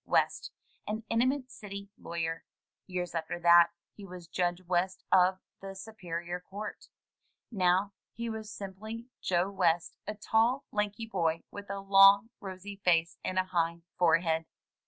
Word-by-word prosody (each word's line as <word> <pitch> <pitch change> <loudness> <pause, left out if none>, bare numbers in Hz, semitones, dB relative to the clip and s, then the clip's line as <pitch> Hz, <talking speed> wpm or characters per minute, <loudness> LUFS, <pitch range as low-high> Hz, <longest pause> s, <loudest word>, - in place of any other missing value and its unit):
West, - - +1 0.4
an 215 +2 -3
eminent 255 +3 +1
city 200 -2 -8
lawyer. 165 -1 -4 0.4
Years 180 -2 -3
after 165 +1 -3
that, 170 0 +8 0.3
he 205 - -11
was 180 -3 -9
Judge 175 0 0
West 185 +2 0
of 185 0 +5 0.2
the 195 0 -7
Superior 180 -4 -5
Court. 200 +4 -8 0.6
Now 190 0 +2 0.2
he 235 0 -5
was 220 -1 -5
simply 215 +4 -7 0.2
Joe 180 +2 +1
West, 175 -3 +1
a 210 - -3
tall, 225 +5 +2
lanky 210 +2 -1
boy 165 -6 0
with 205 -1 -9
a 200 0 -3
long, 195 +2 +7
rosy 195 0 -7
face 165 -1 +2
and 185 - -2
a 185 - +4
high 170 -2 -1 0.2
forehead. 165 -1 +3
190 Hz, 140 wpm, -31 LUFS, 175-205 Hz, 0.6 s, that